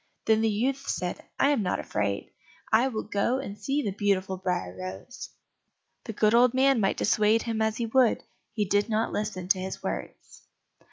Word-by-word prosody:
Then 220 0 +3
the 225 - +2
youth 260 +6 -1
said, 180 -1 -3 0.2
"I 280 - +4
am 275 -6 +1
not 185 - -1
afraid, 100 -1 -2 0.4
I 230 +4 +4
will 220 -5 -3
go 220 +5 0
and 265 -7 -5
see 275 +7 -1
the 205 - -1
beautiful 195 -1 0
Briar 180 - -2
rose." 95 +1 -8 0.8
The 225 - -5
good 215 +1 +2
old 245 +1 +5
man 270 -1 +4
might 195 -2 +1
dissuade 215 +1 +3
him 225 -2 -2
as 220 0 0
he 235 - -1
would, 245 0 +3 0.3
he 210 -2 -1
did 205 +3 +1
not 220 0 0
listen 200 -4 -3
to 190 - +3
his 190 +1 -5
words. - - -6
215 Hz, 185 wpm, -27 LUFS, 190-235 Hz, 0.8 s, old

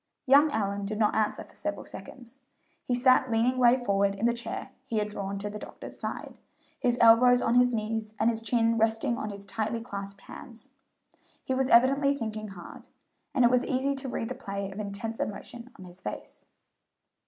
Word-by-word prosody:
Young 285 +3 +6
Allyn 200 -4 -2
did 215 +1 -4
not 210 -1 +2
answer 215 -1 0
for - - -19
several - - -4
seconds. 255 +1 -11 0.4
He 245 - 0
sat 255 +1 +4
leaning 235 +3 +1
way 245 0 +6
forward 200 -5 +1
in 205 - -2
the 235 - +3
chair 235 0 -6
he 235 -4 -3
had 210 0 0
drawn 200 -1 -4
to 200 +1 -4
the 210 +1 -6
doctor's - - -10
side, - - -6 0.4
his 245 -1 +1
elbows 240 +2 +7
on 230 - +1
his 245 0 +5
knees 220 -1 -3
and 220 - +2
his 225 -1 +1
chin 230 0 +1
resting 225 +2 +1
on 215 - -4
his 200 -1 -8
tightly 220 +3 -2
clasped 200 -3 -7
hands. 240 +6 -12 0.7
He 260 - -2
was 260 0 0
evidently 275 +4 +5
thinking 215 -3 -4
hard, 180 -4 -11 0.5
and 255 - +5
it 240 - +5
was 250 0 +3
easy 270 +2 0
to 270 -1 -5
read 225 -2 -3
the - - -3
play 200 -6 -5
of 195 - -8
intense 210 +2 -5
emotion 235 +4 -6
on 185 - -11
his 180 0 -11
face. 105 - -8
225 Hz, 195 wpm, -28 LUFS, 210-250 Hz, 0.7 s, elbows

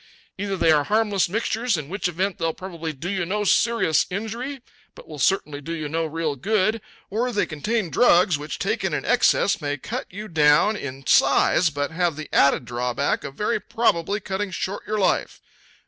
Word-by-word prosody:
Either 195 -1 -2
they 165 - +4
are 150 -2 +3
harmless 210 -1 +1
mixtures, 225 +1 0
in 150 -3 -5
which 195 +3 -2
event 185 +3 -2
they'll 165 -1 -1
probably 170 -4 -6
do 155 +4 -7
you 190 -1 -1
no 205 +5 -1
serious 230 -6 +2
injury, 230 +8 -4 0.4
but - - -14
will 150 -2 -9
certainly 150 -3 0
do 165 +4 -5
you 155 -2 -4
no 160 +2 -1
real 160 -1 -2
good; 215 - 0 0.3
or 230 +5 0
else 245 - -4
they 205 - +2
contain 180 +4 -2
drugs 180 -6 +4
which, 145 0 -5
taken - - -1
to - - -3
excess, - - +3
may 145 -1 -2
cut - - -5
you 210 +4 -8
down 160 +4 +4
in 135 -6 -7
size, 140 +6 +4
but 145 0 -3
have 170 -1 0
the 155 0 -8
added 140 -2 +4
drawback 125 +3 -1
of 135 - -7
very 210 +2 0
probably 210 -3 0
cutting 195 0 -3
short 190 +2 -4
your 215 +1 -1
life. 195 - 0
180 Hz, 190 wpm, -23 LUFS, 150-210 Hz, 0.4 s, they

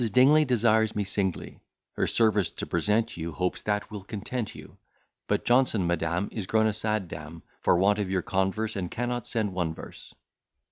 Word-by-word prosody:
Dingley 145 +7 +6
desires 110 -3 +2
me 105 - 0
singly 95 -2 -2 0.3
Her - - -1
service 105 -5 +2
to - - -5
present 105 -1 0
you; 85 -1 -4
hopes 90 +2 -1
that 105 +1 -2
will 105 -2 -6
content 110 +3 -5
you; - - -13 0.5
But - - 0
Johnson 120 -6 +3
madam 85 +2 0
is 105 -5 -5
grown 110 0 +3
a 110 - +2
sad 105 -2 0
dame, 75 +1 -9 0.2
For - - +3
want 100 +3 +3
of 100 -2 -1
your 95 -2 0
converse, 95 +4 -1
and 90 -3 -3
cannot 120 +1 -3
send 110 -4 -1
one 85 -3 -2
verse. - - -10
105 Hz, 180 wpm, -27 LUFS, 95-110 Hz, 0.5 s, Dingley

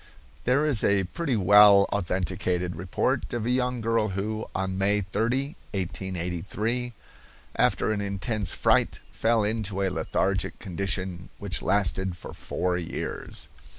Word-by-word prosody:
There 135 +5 +3
is 140 -8 +2
a 100 -1 +3
pretty 140 - -2
well 100 0 +7
authenticated 90 -1 -1
report 90 +2 -1
of 120 -2 -2
a 120 - +1
young 125 -1 0
girl 115 -1 +1
who, 105 +3 -3
on 95 0 -1
May 100 +1 +3
30, 120 - -1 0.2
1883, 95 +6 -3 0.6
after - - +2
an 105 -1 -1
intense 100 +1 -1
fright, - - +2
fell 115 -1 +2
into 105 -2 -1
a 95 - +2
lethargic 95 +1 -1
condition 95 -2 -2
which 100 -4 -4
lasted 95 -2 +1
for - - -9
four 90 -1 -2
years. 85 -2 -4
100 Hz, 130 wpm, -26 LUFS, 95-110 Hz, 0.6 s, well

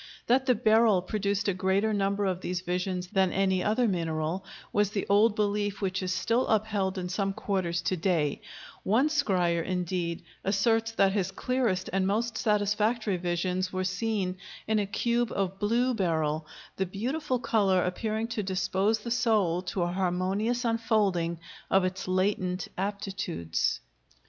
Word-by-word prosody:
That 260 +3 +2
the 250 - +5
beryl 215 -3 +4
produced 200 +1 -1
a 200 - +2
greater 190 +4 +1
number 200 0 0
of 185 -1 -1
these 180 0 -2
visions 180 0 -2
than 190 -1 +2
any 190 -1 +1
other 225 +3 +2
mineral 165 -1 -1 0.3
was 205 -1 +3
the 205 -1 -2
old 205 +2 +4
belief 205 -1 0
which 190 -1 -1
is 185 -1 -2
still 230 +6 +1
upheld 205 -3 0
in 180 -1 -3
some 195 +2 -1
quarters 185 -5 -1
to 185 - 0
day; 165 -5 0 0.4
one 240 +10 +2
scryer, 180 - +1
indeed, 180 -1 -2 0.2
asserts 225 +3 +2
that 195 -3 +3
his 190 -2 0
clearest 230 -2 -1
and 190 0 +2
most 225 +3 0
satisfactory 210 0 +1
visions 180 +1 -1
were 185 0 -2
seen 185 0 -1 0.3
in 220 0 +2
a 205 - -1
cube 235 +3 0
of 195 0 -2
blue 240 +5 +2
beryl, 160 -6 0 0.3
the 190 - 0
beautiful 255 - -2
color 205 -6 +2
appearing 215 +5 -2
to 230 -2 -2
dispose 190 +3 0
the 235 - -5
soul 215 -8 +2
to 180 0 -2
a 175 - -1
harmonious 190 +6 0
unfolding 205 -7 +1 0.3
of 195 0 +4
its 185 0 -3
latent 185 -1 0
aptitudes. 195 - -2
195 Hz, 155 wpm, -28 LUFS, 185-220 Hz, 0.4 s, the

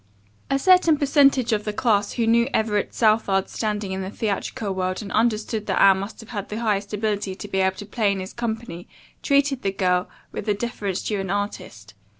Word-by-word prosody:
A 275 - +2
certain 350 0 +5
percentage 275 -4 +3
of 210 -1 0
the 210 - -2
class 205 -2 +1
who 235 - 0
knew 235 +1 +3
Everett 210 -2 0
Southard's 215 -4 +2
standing 210 -3 -2
in 190 0 -3
the 190 - -4
theatrical 205 -1 -3
world 185 +2 -2
and 200 - -8
understood 220 -1 0
that - - 0
Anne 195 -1 +6
must 200 +4 -7
have 210 -3 -6
the 210 - -5
highest 205 -3 -1
ability 205 -2 -2
to 205 - -8
be 190 - -1
able 190 0 +2
to 205 - -8
play 205 0 0
in 195 - -2
his 185 +1 -7
company 220 -7 -5 0.3
treated 280 -2 +2
the 195 - 0
young 195 - -8
girl 180 -1 +1 0.2
with - - -6
the 210 - +2
deference 205 -4 -3
due 210 -2 -2
an 190 -1 -4
artist. 185 - -4
210 Hz, 205 wpm, -23 LUFS, 195-230 Hz, 0.3 s, Anne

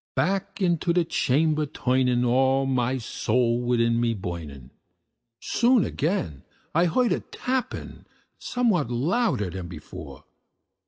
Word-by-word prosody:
Back 195 +3 -1
into 175 -2 +1
the 175 -1 +2
chamber 155 +1 +1
turning, 125 -2 +1
all 130 +2 +3
my 130 -1 0
soul 120 0 0
within 115 -1 +2
me 115 -1 +1
burning, 75 -9 -7 0.7
Soon 240 -2 +3
I - - -2
heard - - -10
again 140 - -2 0.3
a 180 +9 +2
tapping, 255 0 -4 0.3
somewhat 215 - 0
louder 130 - 0
than 90 -1 -6
before. 80 -4 -10
130 Hz, 115 wpm, -25 LUFS, 115-175 Hz, 0.7 s, all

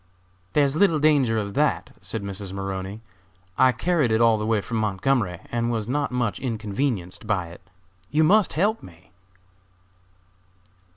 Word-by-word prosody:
"There 150 - +4
is 140 0 0
little 170 -2 +4
danger 145 -7 +3
of 100 -2 -3
that," - - 0
said 110 - -4
Mrs. 100 -1 -6
Maroney. 95 +1 -5 0.5
"I 130 0 +5
carried 155 -1 +1
it 110 - +3
all 115 -2 +4
the 105 - -2
way 110 -1 +2
from 115 +3 -4
Montgomery 105 -2 0
and 120 0 0
was 110 -2 -2
not 140 +1 -1
much 120 -4 -1
inconvenienced 110 -4 -3
by 95 -6 -1
it; 85 - -13 0.5
you 155 +2 +2
must 200 +4 +4
help 210 +7 +1
me." 80 -1 -16
115 Hz, 155 wpm, -24 LUFS, 100-140 Hz, 0.5 s, I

